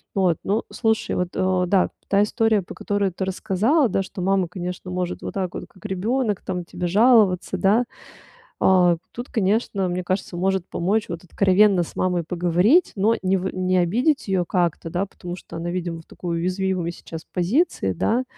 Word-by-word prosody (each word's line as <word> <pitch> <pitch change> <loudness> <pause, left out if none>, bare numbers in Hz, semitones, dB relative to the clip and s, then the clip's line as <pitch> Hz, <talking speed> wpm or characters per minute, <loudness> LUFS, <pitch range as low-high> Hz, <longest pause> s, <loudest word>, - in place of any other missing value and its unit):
Вот, 185 -5 +2
ну, 210 +4 0
слушай, 220 -2 0
вот, 180 -1 -1
э, 185 -1 +1
да, 190 0 +3
п - - -40 0.2
та 200 +1 +4
история, 220 -2 +1
по - - -9
которую 200 -2 -1
ты 190 - -4
рассказала, 220 - +1
да, 195 - +1
что 185 - -8
мама, 190 -2 +2
конечно, 180 +1 -6
может 180 -1 -3
вот - - -6
так 185 -2 -2
вот - - -6
как 185 - -19
ребёнок 210 +3 -1
там 180 -2 -4
тебе 175 +1 -4
жаловаться, 205 -3 +4
да, 210 +7 +3 0.8
э, 180 -2 +5 0.2
тут, 240 +2 -7
конечно, 200 -3 0
мне 180 +1 -2
кажется, 185 -1 -2
может 190 0 0
помочь 205 +5 0
вот 170 +1 -6
откровенно 195 +1 +4
с - - -13
мамой 180 -2 +1
поговорить. 180 - +3
Но 215 +4 +3
не 190 +1 +2
в 190 +1 -3
не 185 0 +1
обидеть 235 - +1
её 185 -2 +1
как-то, 170 -2 -1
да, 185 +4 -1
потому 180 -2 -8
что - - -11
она, 170 +1 -3
видимо, 175 -2 -3
в 160 - -16
такой 170 -2 -4
уязвимой 185 0 -1
сейчас 165 -1 -9
позиции, 180 - +1
да, 235 - 0
185 Hz, 185 wpm, -23 LUFS, 180-205 Hz, 0.8 s, э